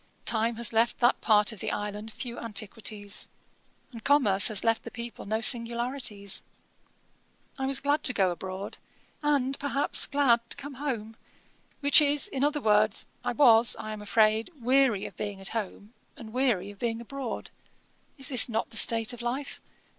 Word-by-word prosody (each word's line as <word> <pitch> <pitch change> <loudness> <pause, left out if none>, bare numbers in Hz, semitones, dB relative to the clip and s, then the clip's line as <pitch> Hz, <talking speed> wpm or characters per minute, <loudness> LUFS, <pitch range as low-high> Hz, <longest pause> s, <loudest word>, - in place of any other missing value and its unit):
Time 230 +1 +1
has 230 0 +2
left 230 +1 +2
that 245 +1 +2
part 210 0 +3
of 220 - -11
the - - -3
island 210 +1 -5
few 240 +1 -7
antiquities; 210 -1 -3 0.6
and 230 -3 -11
commerce 235 -9 +5
has 215 -4 +2
left 225 0 +1
the - - -9
people 235 -3 -8
no 220 +2 -1
singularities. 235 -3 0 1.2
I 265 - -1
was 270 0 +1
glad 285 +2 0
to 250 - +2
go 190 -5 +2
abroad, 190 +3 -6 0.4
and, 275 -3 0
perhaps, 285 0 +2
glad 270 -5 +3
to - - -6
come 285 0 -8
home; 225 -6 -4 0.6
which 285 +2 +6
is, 290 0 +2
in 270 0 -3
other 295 0 +1
words, 210 -1 +2 0.2
I - - -2
was, 235 -3 +5
I 215 - -6
am 215 - -8
afraid, 215 +2 +2
weary 255 -4 +2
of - - -9
being 205 -2 -5
at 195 - -4
home, 215 0 -6 0.2
and 220 -2 -11
weary 235 -7 0
of 200 - -17
being 230 -1 -2
abroad. 255 +1 -6 0.7
Is 265 -3 +3
not 225 0 -2
this 225 - -1
the - - +7
state 225 +1 0
of 240 - -9
life? 255 +4 -4
230 Hz, 170 wpm, -27 LUFS, 215-265 Hz, 1.2 s, the